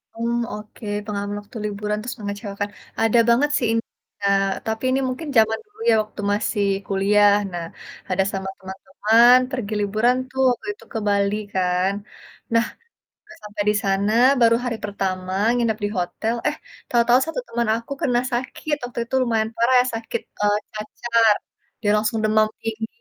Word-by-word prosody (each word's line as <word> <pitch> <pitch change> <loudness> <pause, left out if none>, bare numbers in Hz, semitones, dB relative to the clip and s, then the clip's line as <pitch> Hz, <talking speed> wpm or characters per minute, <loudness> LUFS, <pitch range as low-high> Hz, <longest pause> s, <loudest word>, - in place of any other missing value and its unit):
Mmm, 235 +1 -1 0.2
oke, 210 +1 -9 0.2
pengalaman 205 -1 -3
waktu 205 +3 -11
liburan 210 0 -2
terus 250 +2 -6
mengecewakan, 205 0 -4 0.3
ada 225 +1 +4
banget 265 +5 +4
sih 240 - 0
ini, 230 0 +1 0.4
Kak, 195 0 +2 0.2
tapi 220 +1 -2
ini 265 - +2
mungkin 255 +5 -4
zaman 220 0 +4
dulu 420 +1 -26
ya 225 - +6
waktu 210 0 -9
masih 205 0 0 0.2
kuliah. 205 +1 +4 0.2
Nah, 170 -1 -4 0.5
ada 190 +1 +2
sama 190 0 -4
teman-teman 210 +6 +4
pergi 220 -5 -3
liburan 215 +5 +2
tuh 265 0 -2
waktu 245 - -5
itu - - -18
ke 225 - -1
Bali 200 0 +2 0.2
kan. 185 +1 +1 0.6
Nah, 230 0 +4 0.6
pas 340 0 -14
sampai 210 0 -4
di 210 - +3
sana, 200 +1 +1 0.3
baru 230 0 +6
hari 230 -2 -2
pertama 185 -2 -3 0.2
nginep 230 -3 +1
di - - -1
hotel, 220 +6 -1
eh 300 - 0 0.3
tahu-tahu 240 +1 +4
1 325 +9 -3
teman 235 0 -1
aku 230 +3 -7
kena 245 -3 +2
sakit. 260 +5 -2
Waktu 245 -1 -5
itu 265 - -3
lumayan 225 -2 0
parah 235 +3 +3
ya - - -1
sakit, 225 0 -4 0.2
eee, 205 0 +3
cacar, 220 +1 +2 0.5
dia 205 - +3
langsung 215 +1 0
demam 215 0 +3 0.2
tinggi. 225 0 -3
215 Hz, 165 wpm, -22 LUFS, 205-235 Hz, 0.6 s, ya